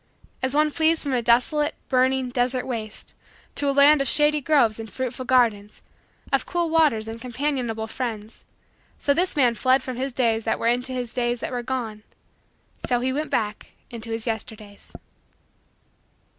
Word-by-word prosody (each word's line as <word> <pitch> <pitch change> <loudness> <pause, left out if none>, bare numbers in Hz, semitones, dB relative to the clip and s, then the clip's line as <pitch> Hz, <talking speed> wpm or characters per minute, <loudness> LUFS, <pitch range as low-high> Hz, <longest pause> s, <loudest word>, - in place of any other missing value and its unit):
As 260 +1 +1
one 305 0 +3
flees 320 +1 +2
from 280 -3 -2
a 245 - +1
desolate, 275 +6 +2
burning, 260 0 +2
desert 250 0 0
waste, 220 -4 -6 0.4
to 285 - 0
a - - +3
land 280 +1 +6
of 275 - -1
shady 300 0 +3
groves 255 -7 +2
and 225 -1 -7
fruitful 255 0 -4
gardens, 225 -5 +1 0.5
of - - +1
cool 345 -2 -1
waters 295 -10 +3
and 225 +1 -7
companionable 250 -3 -2
friends, 220 -2 -6 0.5
so 285 - +1
this 360 +5 0
man 250 -5 +3
fled 255 +3 +2
from 255 -2 -5
his 265 +2 -2
days 230 -3 +1
that 225 - 0
were - - -4
into 250 +2 +1
his 250 -2 -3
days 240 -1 -1
that - - -4
were 245 -1 -2
gone 235 -4 -4 0.9
so 245 -1 +1
he 260 +1 -1
went 300 +3 -2
back 210 -1 -3 0.2
into 230 -1 -6
his 225 0 -3
Yesterdays. 220 -3 -6
250 Hz, 170 wpm, -24 LUFS, 225-275 Hz, 0.9 s, land